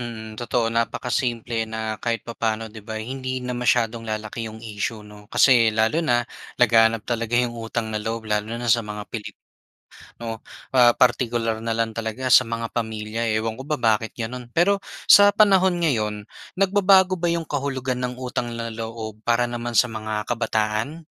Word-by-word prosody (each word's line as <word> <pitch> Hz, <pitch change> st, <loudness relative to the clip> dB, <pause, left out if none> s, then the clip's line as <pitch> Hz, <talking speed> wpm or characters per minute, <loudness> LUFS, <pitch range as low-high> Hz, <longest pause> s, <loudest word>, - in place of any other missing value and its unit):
Mhm, 110 Hz, -2 st, -7 dB
totoo 120 Hz, 0 st, 0 dB
napakasimple 115 Hz, 0 st, -1 dB
na 110 Hz, -1 st, -3 dB
kahit 115 Hz, -1 st, -1 dB
papaano 115 Hz, -1 st, -2 dB
'di 110 Hz, 0 st, -11 dB
ba 110 Hz, 0 st, -5 dB
hindi 130 Hz, +2 st, -4 dB
na 125 Hz, 0 st, -4 dB
masyadong 120 Hz, -1 st, +1 dB
lalaki 110 Hz, +1 st, -4 dB
'yong 110 Hz, 0 st, -10 dB
issue, 110 Hz, 0 st, -4 dB
'no. 105 Hz, 0 st, -14 dB
Kasi 115 Hz, -4 st, +5 dB
lalo 110 Hz, +9 st, +2 dB
na 120 Hz, -5 st, +2 dB, 0.4 s
laganap 115 Hz, -2 st, +4 dB
talaga 115 Hz, -1 st, -2 dB
'yong 120 Hz, -1 st, +1 dB
utang 115 Hz, 0 st, -3 dB
na 110 Hz, -, -1 dB
loob 115 Hz, 0 st, -4 dB
lalo 105 Hz, 0 st, 0 dB
na 120 Hz, -, -3 dB
sa 115 Hz, 0 st, +3 dB
mga 105 Hz, 0 st, -6 dB
Pilipino. 110 Hz, -3 st, -9 dB, 1.2 s
Ah, 120 Hz, -2 st, +6 dB
partikular 120 Hz, -2 st, +1 dB
na 115 Hz, 0 st, -1 dB
lang 115 Hz, -1 st, 0 dB
talaga 115 Hz, +3 st, -3 dB
sa -, -, +9 dB
mga 115 Hz, 0 st, -3 dB
pamilya, 110 Hz, 0 st, -3 dB
ewan 110 Hz, 0 st, -3 dB
ko -, -, -6 dB
ba 150 Hz, -, 0 dB
bakit 110 Hz, -2 st, +1 dB
gano'n? 120 Hz, +1 st, -5 dB
Pero 195 Hz, +4 st, +3 dB, 0.2 s
sa 205 Hz, 0 st, +8 dB
panahon 190 Hz, -4 st, +4 dB
ngayon, 105 Hz, -9 st, 0 dB, 0.3 s
nagbabago 195 Hz, -1 st, +4 dB
ba 175 Hz, 0 st, +1 dB
'yong 170 Hz, -1 st, -1 dB
kahulugan 130 Hz, -3 st, -2 dB
ng 125 Hz, 0 st, -2 dB
utang 125 Hz, -1 st, -3 dB
na 115 Hz, -1 st, -5 dB
loob 110 Hz, -1 st, -6 dB
para 120 Hz, +1 st, +3 dB
naman 120 Hz, 0 st, -4 dB
sa -, -, +6 dB
mga 110 Hz, -1 st, -4 dB
kabataan? 115 Hz, +6 st, -1 dB
115 Hz, 165 wpm, -23 LUFS, 110-125 Hz, 1.2 s, sa